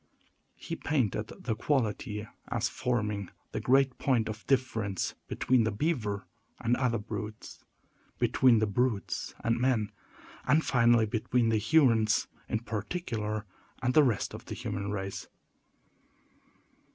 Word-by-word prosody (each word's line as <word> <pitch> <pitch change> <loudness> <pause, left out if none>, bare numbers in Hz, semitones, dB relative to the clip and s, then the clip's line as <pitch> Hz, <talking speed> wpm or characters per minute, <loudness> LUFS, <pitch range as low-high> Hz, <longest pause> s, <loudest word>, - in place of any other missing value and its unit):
He - - -5
painted 110 -7 0
the 115 - -4
quality 110 -4 -1 0.2
as - - 0
forming 105 -6 -1 0.2
the - - -2
great 135 0 +3
point 120 -5 +2
of 110 +1 -7
difference 115 -7 0
between 125 -2 +2
the 110 - +1
beaver 105 -5 -1 0.3
and 120 0 +2
other 125 -3 +1
brutes; 105 0 -7 0.5
between 125 -3 +4
the 110 - +3
brutes 110 0 -1
and 115 +1 +1
men; 120 -5 +2 0.6
and, 150 +5 +4
finally, 120 -2 +4
between 115 +2 +1
the 110 -1 +2
Hurons, 115 -4 +4 0.2
in 110 - 0
particular, 110 - -3 0.4
and 125 0 +2
the 155 - +7
rest 120 -7 0
of - - -8
the - - -6
human 100 +1 -3
race. 95 -1 -4
115 Hz, 125 wpm, -30 LUFS, 105-130 Hz, 0.6 s, the